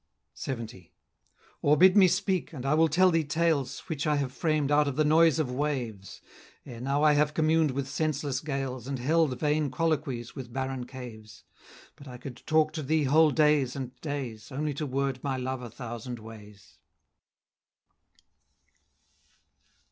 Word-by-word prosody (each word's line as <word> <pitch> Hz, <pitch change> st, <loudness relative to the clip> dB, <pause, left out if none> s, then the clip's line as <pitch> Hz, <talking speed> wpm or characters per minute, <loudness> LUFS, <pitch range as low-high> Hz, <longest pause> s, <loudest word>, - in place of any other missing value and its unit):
LXX. 115 Hz, -8 st, -6 dB, 0.7 s
"Or 150 Hz, +1 st, +4 dB
bid 185 Hz, +2 st, +6 dB
me 195 Hz, -3 st, +7 dB
speak, 185 Hz, -1 st, -1 dB
and 135 Hz, -3 st, -7 dB
I 140 Hz, -, +2 dB
will 160 Hz, +1 st, +4 dB
tell 180 Hz, +4 st, +4 dB
thee 165 Hz, -1 st, +2 dB
tales, 150 Hz, -3 st, 0 dB
Which 155 Hz, -2 st, -4 dB
I 150 Hz, -, +2 dB
have 140 Hz, -3 st, -1 dB
framed 155 Hz, -1 st, 0 dB
out 145 Hz, 0 st, +4 dB
of 140 Hz, -, -2 dB
the 155 Hz, +1 st, +2 dB
noise 160 Hz, -1 st, +5 dB
of 150 Hz, -6 st, -1 dB
waves; 125 Hz, -8 st, -4 dB, 0.4 s
Ere 120 Hz, -4 st, -9 dB
now 140 Hz, +3 st, 0 dB
I 150 Hz, -1 st, +6 dB
have 150 Hz, +1 st, +1 dB
communed 160 Hz, 0 st, +3 dB
with 135 Hz, 0 st, -3 dB
senseless 140 Hz, -2 st, -1 dB
gales, 135 Hz, -4 st, -4 dB
And 135 Hz, -1 st, -3 dB
held 145 Hz, +1 st, +1 dB
vain 150 Hz, -1 st, +1 dB
colloquies 135 Hz, -4 st, -2 dB
with 130 Hz, -4 st, -8 dB
barren 130 Hz, -1 st, -3 dB
caves; 110 Hz, -6 st, -10 dB, 0.5 s
But 145 Hz, -2 st, -14 dB
I 125 Hz, -1 st, -8 dB
could 125 Hz, 0 st, -9 dB
talk 155 Hz, 0 st, +3 dB
to 155 Hz, -, -4 dB
thee 155 Hz, +2 st, +1 dB
whole 155 Hz, +3 st, +5 dB
days 150 Hz, -4 st, +2 dB
and 130 Hz, -2 st, -6 dB
days, 135 Hz, -7 st, -6 dB
Only 150 Hz, +2 st, -2 dB
to 150 Hz, +2 st, -4 dB
word 135 Hz, -1 st, -2 dB
my 135 Hz, -2 st, -1 dB
love 130 Hz, 0 st, -3 dB
a 120 Hz, -, -7 dB
thousand 120 Hz, +1 st, -7 dB
ways." 105 Hz, -2 st, -14 dB
140 Hz, 165 wpm, -28 LUFS, 125-155 Hz, 0.7 s, me